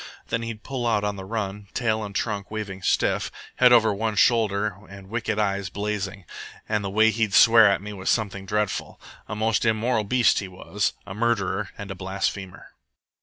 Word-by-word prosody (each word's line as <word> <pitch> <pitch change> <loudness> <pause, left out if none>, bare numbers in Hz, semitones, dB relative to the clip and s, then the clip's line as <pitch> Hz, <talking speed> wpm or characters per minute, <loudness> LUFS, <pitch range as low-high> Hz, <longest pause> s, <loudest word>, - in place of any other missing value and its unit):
Then 115 - -1
he'd 115 -2 -6
pull 130 -3 -3
out 105 -3 +1
on 105 0 -1
the 95 -1 -8
run, 105 -1 -4
tail 110 -3 0
and 100 -1 -7
trunk 100 -2 -2
waving 100 -3 -5
stiff, - - +1 0.3
head 125 -1 +6
over 110 -3 +5
one 110 +1 -2
shoulder 105 -3 +2
and 100 -1 -12
wicked 115 -2 -2
eyes 100 -2 0
blazing, 100 -1 -4 0.4
and 105 -1 0
the 100 - -2
way 110 +3 +4
he'd 110 -2 0
swear 115 -3 +8
at 100 0 0
me 105 0 -6
was 95 -1 -4
something 100 -3 -1
dreadful. 105 -1 -2 0.3
A - - -5
most 110 0 +1
immoral 110 0 +1
beast 120 +2 +3
he 100 - -5
was, 95 +2 -2
a 95 - -7
murderer, 105 -2 0
and 100 -1 -7
a - - -5
blasphemer. 95 0 -4
105 Hz, 185 wpm, -24 LUFS, 100-110 Hz, 0.4 s, swear